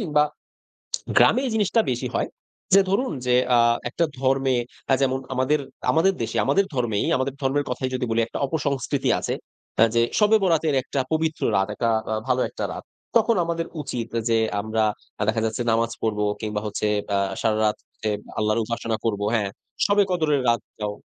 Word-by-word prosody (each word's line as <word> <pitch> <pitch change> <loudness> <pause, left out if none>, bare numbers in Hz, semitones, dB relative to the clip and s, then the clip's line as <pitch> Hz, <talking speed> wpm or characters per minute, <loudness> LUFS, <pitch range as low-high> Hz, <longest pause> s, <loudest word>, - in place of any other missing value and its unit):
কিংবা 150 -7 +2 0.9
গ্রামে - - +6
এই - - -1
জিনিসটা 215 +1 +2
বেশি 125 -1 -2
হয়। - - 0 0.5
যে 195 - +8
ধরুন 235 +4 +1
যে, 125 - +3 0.2
আ - - +5 0.3
একটা 170 - +1 0.2
ধর্মে 135 0 +2 0.4
আ - - +7
যেমন 130 -1 +2 0.2
আমাদের, 130 +4 +2 0.3
আমাদের 175 +5 +4
দেশে - - -3
আমাদের 200 - +3
ধর্মেই, 120 -5 0
আমাদের 130 +1 -1
ধর্মের 140 +2 +1
কথাই 130 +1 -2
যদি 130 0 -1
বলি 115 +1 +2
একটা - - -6
অপসংস্কৃতি 140 -3 -1
আছে। - - -2 0.4
হ্যাঁ, 115 0 +5
যে - - +5 0.2
শবে 210 +1 +5
বরাতের 165 -5 +2
একটা 135 - -2
পবিত্র 160 0 0
রাত 95 0 +2
একটা 115 +2 0 0.2
আ - - +1
ভালো 130 0 +2
একটা - - -5
রাত। - - -7 0.3
তখন 230 0 +5
আমাদের 165 0 -2 0.2
উচিত 120 -5 -4 0.2
যে, 115 -1 +3 0.2
আমরা 110 +1 -1 0.4
আ - - 0
দেখা 110 +1 +2
যাচ্ছে 110 +2 -2
নামাজ 115 +1 +1
পড়বো 105 -2 0 0.2
কিংবা 105 -1 -2
হচ্ছে 105 0 -2 0.3
আ - - +3 0.3
সারারাত 110 -1 +2
হচ্ছে 110 - -6 0.3
আল্লাহর 110 +2 +1
উপাসনা 115 0 -2
করব। 105 -3 0
হ্যাঁ, 105 -3 +1 0.4
শবে 205 0 +4
কদরের 155 -5 +2
রাতটাও। 105 -2 -1
130 Hz, 175 wpm, -24 LUFS, 110-160 Hz, 0.9 s, যে